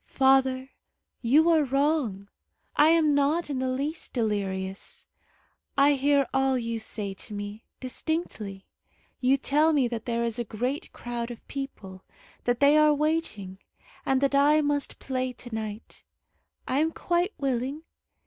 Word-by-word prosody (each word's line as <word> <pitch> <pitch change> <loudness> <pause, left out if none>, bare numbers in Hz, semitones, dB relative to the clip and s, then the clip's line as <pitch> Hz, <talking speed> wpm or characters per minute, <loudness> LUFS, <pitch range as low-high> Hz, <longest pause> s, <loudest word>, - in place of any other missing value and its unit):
"Father, 265 0 +2 0.5
you 290 +7 +4
are 315 -2 +4
wrong. 275 -7 0 0.5
I 300 +2 +6
am 320 -3 +4
not 290 +3 +1
in 265 - -2
the 260 - -1
least 285 +5 -3
delirious. 195 -4 -3 0.7
I 280 +1 +6
hear 280 0 +3
all 265 0 +2
you 230 -1 -3
say 210 -2 -4
to 210 +2 -10
me, 205 +2 -7
distinctly. 255 - -3 0.5
You 265 +2 +3
tell 300 +4 +3
me 275 -4 +3
that 230 -1 -5
there 235 -1 -1
is 235 0 -2
a - - 0
great 245 +6 -3
crowd 240 -1 -5
of 240 - -10
people, 200 -9 -7 0.4
that 245 +1 0
they 285 +2 +6
are 305 -1 +5
waiting, 290 - -2 0.4
and 265 0 +1
that 275 0 +2
I 290 +2 +5
must 290 -1 -1
play 255 -1 -3
to 245 -1 -11
night. 215 -1 -6 0.6
I 260 - +1
am 320 +2 +2
quite 350 +5 0
willing. 270 +3 -2
265 Hz, 150 wpm, -27 LUFS, 230-290 Hz, 0.7 s, I